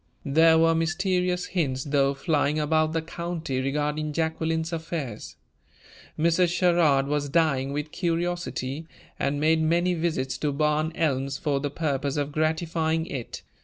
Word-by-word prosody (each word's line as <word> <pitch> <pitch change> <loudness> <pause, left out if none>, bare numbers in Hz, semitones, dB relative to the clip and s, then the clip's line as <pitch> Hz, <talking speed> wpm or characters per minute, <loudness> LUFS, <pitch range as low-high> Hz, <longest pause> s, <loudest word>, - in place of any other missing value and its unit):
There 160 +3 +5
were 165 0 +4
mysterious 180 +2 0
hints, 135 -8 -1
though, 140 -1 +1
flying 150 0 +1
about 155 +1 +1
the 165 -1 -1
county 165 -5 -4
regarding 150 +2 -1
Jacqueline's 160 +1 -1
affairs. 160 -8 -5 0.8
Mrs. 170 +2 +3
Sherrard 170 -6 +3
was 145 0 -1
dying 140 -4 +1
with 150 +1 -4
curiosity, 170 -4 -2 0.3
and 140 +1 0
made 160 +1 +3
many 170 +3 +2
visits 160 -6 -2
to 150 - 0
Barn 150 +2 +1
Elms 135 -3 0
for 145 -3 0
the 145 +1 -2
purpose 140 -2 -2
of 145 0 -1
gratifying 160 +1 0
it. 130 -7 -6
155 Hz, 135 wpm, -26 LUFS, 145-165 Hz, 0.8 s, There